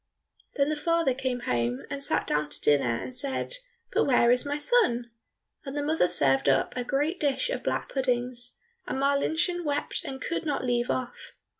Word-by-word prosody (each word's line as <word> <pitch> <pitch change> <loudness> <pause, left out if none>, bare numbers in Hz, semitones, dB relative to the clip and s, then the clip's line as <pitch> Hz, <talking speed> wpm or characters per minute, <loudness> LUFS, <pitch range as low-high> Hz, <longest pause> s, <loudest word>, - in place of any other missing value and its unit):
Then 280 0 +2
the 305 - 0
father 335 -2 +1
came 255 -1 -3
home, 120 - -1
and 280 0 -3
sat - - +1
down 150 0 0
to - - -1
dinner 130 -5 +2
and 255 - -7
said, 275 - -1 0.4
"But - - +3
where 245 -3 +4
is 250 +3 +3
my 290 +1 -1
son?" 245 - +2 0.5
And 275 0 -6
the 290 - 0
mother 305 - +2
served 135 -3 +3
up 135 0 +1
a 250 - -2
great 290 +8 -1
dish 300 - 0
of - - -2
black - - -2
puddings, 250 -2 0 0.3
and - - -2
Marlinchen 315 +6 +1
wept 290 -1 -2
and 265 -1 -6
could 335 +6 -3
not 290 -4 -2
leave 240 -1 0
off. 250 -1 -4
265 Hz, 185 wpm, -27 LUFS, 240-295 Hz, 0.5 s, where